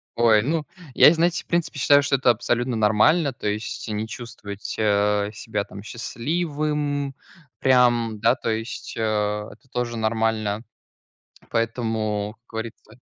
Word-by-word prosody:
Ой, 115 -2 +5
ну 150 +5 -1 0.3
Я, - - +9
и - - +3
знаете, 170 +1 +1
в - - -41
принципе, 170 -3 -1
считаю, 145 +2 +6
что 140 0 +2
это 125 -2 +4
абсолютно 120 +2 -1
нормально, 110 - +3
то 105 - -5
есть, 105 +3 -3
и - - -4
не 110 +1 -2
чувствовать, 110 -4 -7
э, 105 -1 +2
себя 105 0 -3
там 100 0 -11
счастливым, 145 +3 -2 0.5
прям, 120 -4 +3
да, 115 +3 +4
то 115 - -4
есть, 110 +1 -4
э, - - -4
это 105 +2 -2
тоже 120 -2 -2
нормально. 110 -1 0 0.9
Поэтому, 110 -2 -1
как 120 - -51
говорится 110 -1 -7
115 Hz, 145 wpm, -23 LUFS, 105-135 Hz, 0.9 s, Я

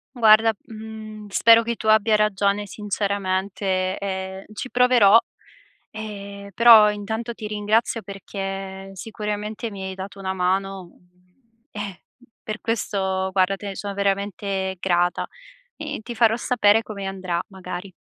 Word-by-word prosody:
Guarda, 225 -1 +6
mhmm, 215 -1 -9
spero 230 +3 +6
che 235 +1 -2
tu 220 - -6
abbia 215 0 +5
ragione 205 -1 +1
sinceramente, 195 -2 -2
e 190 -1 -5
ci 250 +4 -6
proverò, 245 -4 +6 0.7
ehm, 200 -2 -8
però 225 -3 +8
intanto 220 +3 -4
ti 215 -2 -7
ringrazio 215 +2 0
perché, 195 -1 -6
sicuramente, 210 +2 -5
mi 195 -1 -7
hai 190 0 -5
dato 195 +1 -8
una 190 -1 -2
mano; 190 0 -1 0.8
eh, 205 -3 -6 0.4
per 215 0 -5
questo, 190 -4 -1
guarda, 190 +1 +2
te 205 - -8
ne 195 - -5
so 200 0 -5
veramente 195 -1 -1
grata 175 -1 +1 0.5
e - - -4
ti 240 +1 -7
farò 225 -1 +4
sapere 225 -3 +3
come 200 -2 -7
andrà, 185 -3 -3
magari. 185 0 -7
200 Hz, 130 wpm, -23 LUFS, 190-215 Hz, 0.8 s, però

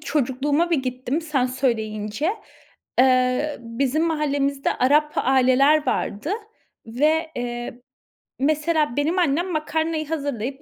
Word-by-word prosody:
çocukluğuma 290 +3 0
bir 335 - +3
gittim 255 +4 -2
sen 290 -6 0
söyleyince. 225 - -1 0.7
Eee, 255 +3 +3
bizim 255 +6 -1
mahallemizde 280 -3 0
Arap 300 +4 +3
aileler 270 +3 +3
vardı 215 +11 -2 0.6
ve, 310 +8 +1
eee, 240 0 -5 0.6
mesela 305 -1 +1
benim 315 +6 +1
annem 345 +2 +1
makarnayı 315 0 -1
hazırlayıp 280 -4 -3
280 Hz, 100 wpm, -23 LUFS, 250-310 Hz, 0.7 s, bir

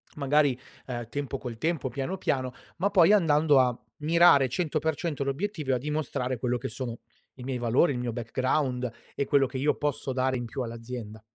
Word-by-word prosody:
magari, 140 -2 +2 0.3
uhm, 120 -2 -4
tempo 140 0 -3
col 120 -4 -7
tempo, 155 0 -1
piano 140 +9 -3
piano, 130 -5 -1 0.2
ma 190 +4 +1
poi 195 -1 +5
andando 150 -6 +4
a 125 -2 +2 0.2
mirare 155 -4 +5
100% 155 -1 -1
l'obiettivo 150 +1 -2
e - - +3
a - - +2
dimostrare 130 -2 -2
quello 125 0 0
che 120 - -5
sono 120 0 -5 0.4
i 125 - -10
miei 130 -1 -2
valori, 120 +7 +3
il 125 - -3
mio 120 -2 -2
background 125 +2 -1 0.3
e 140 - 0
quello 140 -1 +4
che 130 - -6
io 145 +3 +2
posso 145 -2 -2
dare 130 0 +1
in 120 - -4
più 120 +3 -5
all'azienda. 115 -2 -6
135 Hz, 185 wpm, -28 LUFS, 125-150 Hz, 0.4 s, poi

